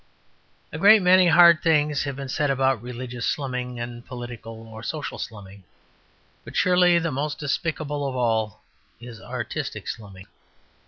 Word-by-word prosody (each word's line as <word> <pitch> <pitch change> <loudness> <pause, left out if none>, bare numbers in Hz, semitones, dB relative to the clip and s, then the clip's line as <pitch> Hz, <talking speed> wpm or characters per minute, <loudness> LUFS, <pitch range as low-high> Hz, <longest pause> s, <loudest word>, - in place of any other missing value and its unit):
A - - -5
great 205 0 +7
many 180 0 +6
hard 170 0 +7
things 150 -3 +2
have 140 -2 -4
been 135 0 -6
said 145 +2 -1
about 135 -3 +1
religious 125 0 -7
slumming 125 -3 -3
and 120 0 -6
political 120 -2 -9
or 110 0 -10
social 150 +5 -5
slumming, 100 -2 -9 0.8
but - - -11
surely 180 -1 +4
the 165 -1 -1
most 145 +2 -3
despicable 150 0 -2
of 130 - -4
all 110 -4 -1 0.4
is 120 -3 -11
artistic - - -5
slumming. 95 -3 -8
130 Hz, 145 wpm, -24 LUFS, 120-155 Hz, 0.8 s, great